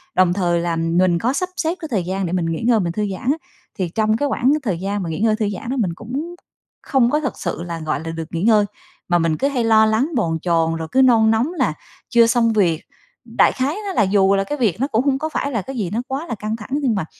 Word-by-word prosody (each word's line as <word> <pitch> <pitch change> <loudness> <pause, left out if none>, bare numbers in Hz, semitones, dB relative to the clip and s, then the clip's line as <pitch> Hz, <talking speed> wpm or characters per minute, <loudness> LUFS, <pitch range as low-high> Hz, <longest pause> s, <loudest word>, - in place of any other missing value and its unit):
đồng 185 -1 +4
thời 175 -3 +1
là 170 -1 -1
mình 170 +1 +2
có 250 +4 0
sắp 365 +4 -1
xếp 330 +2 0
cái 320 - -4
thời 195 -6 0
gian 190 +1 -2
để 170 - -3
mình 175 -2 0
nghỉ 165 -1 -2
ngơi, 230 -3 +4
mình 170 -3 -1
thư 210 +1 -1
giãn 250 +8 -1
á, 310 - -1 0.4
thì 180 -3 -1
trong 215 +3 +1
cái 285 - 0
quãng 265 +3 +2
thời 185 -7 -1
gian 200 +1 -2
mà 165 - -4
nghỉ 160 - -4
ngơi 220 -1 +3
thư 215 -2 -1
giãn 205 +4 -6
đó 270 - -2
mình 180 -6 0
cũng 280 - -5 0.5
không 255 -4 +2
có 300 - +2
thực 275 - -4
sự 170 -1 -3
là, 170 -2 -5
gọi 155 -2 -2
là, 165 - -3
được 165 -1 -5
nghỉ 170 +2 -2
ngơi, 215 -2 +4 0.4
mà 175 0 +3
mình 165 -2 +1
cứ 275 - +1
hay 255 -4 -1
lo 220 -1 +5
lắng, 220 +8 +1
bồn 165 -8 0
chồn, 165 -2 +1
rồi 160 -1 -5
cứ 265 - +4
nôn 225 -4 +5
nóng 245 +10 +1
là - - 0 0.4
chưa 235 -1 +5
xong 230 -1 +2
việc. 170 -6 +2 0.4
Đại - - +3
khái 270 +4 -1
nó 385 - -3
là 215 - +3
dù 195 0 +3
là 195 - +1
cái 295 +9 -4
việc 225 -5 0
nó 270 - +1
cũng 245 +1 0
hông 270 -1 +2
có 315 +1 -2
phải 280 -2 -2
là 225 -5 -1
cái 270 +5 -7
gì 190 -6 -2
nó 230 +3 -1
quá 280 +5 -4
là 230 - -3
căng 215 +2 -3
thẳng, 215 +3 -10
nhưng 275 -6 +1
mà 185 -5 -2
215 Hz, 285 wpm, -20 LUFS, 175-255 Hz, 0.5 s, lo